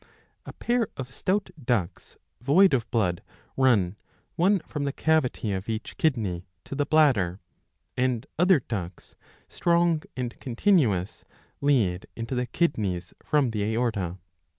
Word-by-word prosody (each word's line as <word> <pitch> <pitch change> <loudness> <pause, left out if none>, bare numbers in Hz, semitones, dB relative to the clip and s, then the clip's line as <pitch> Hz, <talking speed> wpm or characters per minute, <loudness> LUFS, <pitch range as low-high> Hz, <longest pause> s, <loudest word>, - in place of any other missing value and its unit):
A - - -7
pair 240 -2 0
of 130 -2 -6
stout 190 +4 -1
ducts, 110 -8 -2 0.2
void 160 +7 +5
of 120 -4 0
blood, 90 -7 0 0.3
run, 105 -8 +3 0.4
one 190 +4 +4
from 150 -2 -5
the 140 - 0
cavity 145 -8 +1
of 95 +3 -4
each 110 0 -4
kidney, 105 - 0 0.2
to - - -7
the 145 +1 -1
bladder; 125 - +3 0.6
and 125 -2 0
other 180 -2 +5
ducts, 95 -7 -6 0.3
strong 170 -2 +2 0.2
and 120 -2 -4
continuous, 120 - +1 0.4
lead 115 -11 +2
into 115 +3 -5
the 125 -1 -1
kidneys 100 - -1
from 145 -5 +2
the 105 -2 -2
aorta. 105 -5 -1
125 Hz, 130 wpm, -26 LUFS, 105-155 Hz, 0.6 s, void